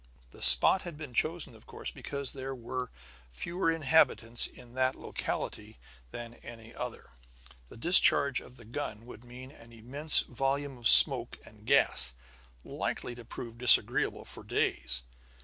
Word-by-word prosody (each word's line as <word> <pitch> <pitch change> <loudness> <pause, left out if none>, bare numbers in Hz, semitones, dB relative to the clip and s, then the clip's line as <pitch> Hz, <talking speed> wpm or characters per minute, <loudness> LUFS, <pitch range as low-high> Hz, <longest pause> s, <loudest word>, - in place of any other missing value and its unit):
The - - -16
spot 65 - +7
had 170 -4 -10
been 150 -5 -10
chosen, 155 -1 -2
of 110 - -20
course, - - -7
because 140 -1 -7
there 135 0 -8
were 125 +1 -7 0.4
fewer 170 - -4
inhabitants 150 -7 +1
in 120 -1 -17
that 130 0 -1
locality 110 +1 -7 0.3
than 120 - -10
any 115 0 -13
other; 125 - -9 0.6
the - - -14
discharge 140 -2 +3
of 125 - -15
the 115 - -16
gun 115 -2 -8
would 120 -1 -14
mean 125 +2 -13
an 115 -5 -18
immense 135 +7 +3
volume 135 +1 -4
of 120 - 0
smoke - - +7
and - - -19
gas, 60 -1 +4 0.5
likely 120 - -6
to 120 0 -13
prove 115 0 -11
disagreeable 125 -1 0
for - - -10
days. 60 -1 -3
125 Hz, 150 wpm, -28 LUFS, 115-140 Hz, 0.6 s, spot